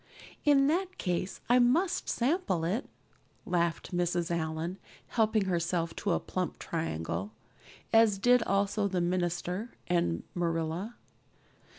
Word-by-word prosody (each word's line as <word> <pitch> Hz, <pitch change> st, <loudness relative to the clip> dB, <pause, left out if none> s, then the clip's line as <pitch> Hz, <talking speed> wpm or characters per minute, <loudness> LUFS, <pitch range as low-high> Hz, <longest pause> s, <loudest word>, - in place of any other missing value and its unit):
"In 280 Hz, -2 st, +5 dB
that 365 Hz, +5 st, 0 dB
case 180 Hz, 0 st, -2 dB
I 245 Hz, +1 st, +5 dB
must 305 Hz, +10 st, +2 dB
sample 235 Hz, -, 0 dB
it," 205 Hz, +10 st, -1 dB, 0.6 s
laughed 170 Hz, 0 st, -1 dB
Mrs. 175 Hz, -1 st, 0 dB
Allan, 160 Hz, +3 st, -3 dB, 0.3 s
helping 220 Hz, -3 st, +2 dB
herself 170 Hz, -2 st, -1 dB
to 200 Hz, -, 0 dB
a -, -, +1 dB
plump 185 Hz, -1 st, -3 dB
triangle, 95 Hz, -, -3 dB, 0.6 s
as 225 Hz, -3 st, +6 dB
did 245 Hz, +4 st, +5 dB
also 200 Hz, 0 st, +1 dB
the 185 Hz, -2 st, -1 dB
minister 180 Hz, +4 st, -1 dB
and 170 Hz, -, +1 dB
Marilla. 170 Hz, +5 st, -2 dB
180 Hz, 115 wpm, -30 LUFS, 170-225 Hz, 0.6 s, as